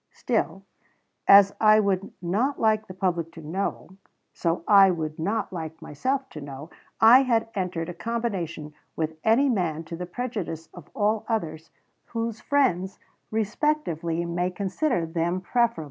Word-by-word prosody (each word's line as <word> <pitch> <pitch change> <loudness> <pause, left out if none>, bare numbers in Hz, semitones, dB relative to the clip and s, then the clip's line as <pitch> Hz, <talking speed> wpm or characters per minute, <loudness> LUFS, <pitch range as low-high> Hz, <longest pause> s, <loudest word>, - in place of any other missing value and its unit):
Still, 220 -5 -1 0.6
as 200 0 +8
I 215 0 +7
would 195 -2 0
not 225 +11 0
like 215 -1 +2
the 185 - -8
public 175 -3 -1
to 165 - -10
know, 190 +2 -4 0.4
so 165 -1 -1
I 195 -2 +7
would 160 -3 -3
not 205 +5 -2
like 160 -2 -6
myself 265 - -2
to 150 - -9
know, 140 +3 -9 0.3
I 235 +4 +8
had 230 -4 +1
entered 180 -4 -2
a 175 - -5
combination 190 -10 -4 0.2
with 160 0 -3
any 235 +6 +4
man 175 - 0
to 165 +1 -7
the 180 +1 -6
prejudice 185 -7 -5
of 175 -2 -12
all 215 -2 +1
others 165 -8 -3 0.4
whose 230 -1 -4
friends 195 -10 +1 0.3
respectively 210 - -1
may 175 +1 -1
consider 190 - -1
them 170 +2 -1
preferable." 235 +2 +1
190 Hz, 145 wpm, -25 LUFS, 165-225 Hz, 0.6 s, as